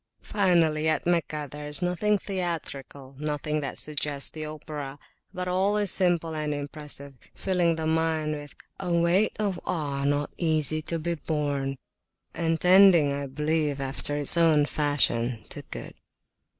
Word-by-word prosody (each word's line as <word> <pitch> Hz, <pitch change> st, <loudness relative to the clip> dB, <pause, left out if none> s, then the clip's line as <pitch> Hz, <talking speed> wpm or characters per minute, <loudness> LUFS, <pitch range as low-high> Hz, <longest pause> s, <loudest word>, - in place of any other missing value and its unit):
Finally, 165 Hz, -6 st, +2 dB
at 155 Hz, -, 0 dB
Meccah 160 Hz, -4 st, 0 dB
there 150 Hz, 0 st, -7 dB
is 150 Hz, +4 st, -1 dB
nothing 190 Hz, +4 st, +1 dB
theatrical, 155 Hz, -8 st, -4 dB
nothing 150 Hz, 0 st, -2 dB
that 140 Hz, -, -4 dB
suggests 145 Hz, -2 st, -2 dB
the 155 Hz, -, -6 dB
opera; 150 Hz, -2 st, -6 dB, 0.3 s
but 180 Hz, 0 st, -4 dB
all 190 Hz, +3 st, +1 dB
is 205 Hz, -3 st, +1 dB
simple 175 Hz, -3 st, +2 dB
and 150 Hz, -1 st, -2 dB
impressive, 145 Hz, -1 st, -6 dB, 0.2 s
filling 180 Hz, -3 st, +1 dB
the 160 Hz, 0 st, -3 dB
mind 160 Hz, -1 st, +1 dB
with 145 Hz, -1 st, -8 dB, 0.2 s
A 180 Hz, -2 st, -3 dB
weight 170 Hz, +5 st, +3 dB
of 200 Hz, -4 st, -1 dB
awe 145 Hz, -5 st, -2 dB
not 145 Hz, +1 st, 0 dB
easy 155 Hz, -2 st, +1 dB
to 165 Hz, +2 st, -2 dB
be 170 Hz, +2 st, -2 dB
borne, 145 Hz, -4 st, -2 dB, 0.6 s
and 165 Hz, -1 st, 0 dB
tending, 180 Hz, -5 st, +6 dB
I 140 Hz, 0 st, -3 dB
believe, 150 Hz, +1 st, -1 dB
after 140 Hz, +2 st, -1 dB
its 145 Hz, -2 st, +5 dB, 0.4 s
fashion, 125 Hz, -6 st, +1 dB
to -, -, -5 dB
good. -, -, -7 dB
155 Hz, 145 wpm, -27 LUFS, 145-170 Hz, 0.6 s, tending